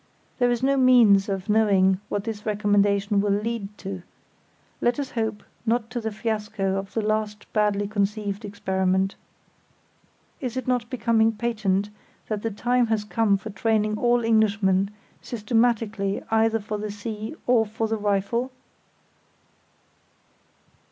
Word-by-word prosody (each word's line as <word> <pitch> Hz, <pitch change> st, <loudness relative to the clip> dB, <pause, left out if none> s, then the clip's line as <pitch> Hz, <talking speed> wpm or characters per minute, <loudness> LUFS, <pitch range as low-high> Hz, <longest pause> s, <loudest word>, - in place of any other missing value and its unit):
There 245 Hz, -1 st, +4 dB
is 240 Hz, 0 st, -1 dB
no 275 Hz, +1 st, +3 dB
means 230 Hz, -7 st, +5 dB
of 195 Hz, -1 st, -3 dB
knowing 195 Hz, -3 st, +3 dB
what 205 Hz, -, -2 dB
this 215 Hz, -2 st, -5 dB
recommendation 205 Hz, -1 st, +2 dB
will 205 Hz, -, 0 dB
lead 210 Hz, -2 st, -4 dB
to; 190 Hz, -2 st, -6 dB, 0.8 s
let 240 Hz, 0 st, +2 dB
us 275 Hz, -2 st, -3 dB
hope 220 Hz, -2 st, -2 dB, 0.2 s
not 230 Hz, 0 st, 0 dB
to 245 Hz, -1 st, -3 dB
the 220 Hz, 0 st, -3 dB
fiasco 210 Hz, -2 st, -2 dB
of 195 Hz, 0 st, -6 dB
the 225 Hz, -, 0 dB
last 215 Hz, 0 st, -1 dB
badly 205 Hz, -1 st, +1 dB
conceived 205 Hz, 0 st, -2 dB
experiment. 190 Hz, -1 st, 0 dB, 1.3 s
Is 255 Hz, -2 st, -4 dB
it 260 Hz, -, -4 dB
not 245 Hz, -2 st, 0 dB
becoming 230 Hz, -3 st, +2 dB
patent 210 Hz, -3 st, -1 dB, 0.4 s
that 215 Hz, -2 st, -2 dB
the 225 Hz, -, -1 dB
time 245 Hz, +3 st, +1 dB
has 220 Hz, -2 st, 0 dB
come 210 Hz, -1 st, +2 dB
for 215 Hz, +3 st, -8 dB
training 215 Hz, +1 st, 0 dB
all 240 Hz, -1 st, +2 dB
Englishmen 205 Hz, -3 st, +2 dB, 0.3 s
systematically 220 Hz, -3 st, 0 dB
either 225 Hz, 0 st, +3 dB
for 210 Hz, 0 st, -5 dB
the 210 Hz, 0 st, -4 dB
sea 215 Hz, +4 st, -6 dB
or 245 Hz, -2 st, +4 dB
for 220 Hz, +1 st, -3 dB
the 220 Hz, 0 st, -1 dB
rifle? 210 Hz, +4 st, 0 dB
215 Hz, 140 wpm, -25 LUFS, 200-230 Hz, 1.3 s, means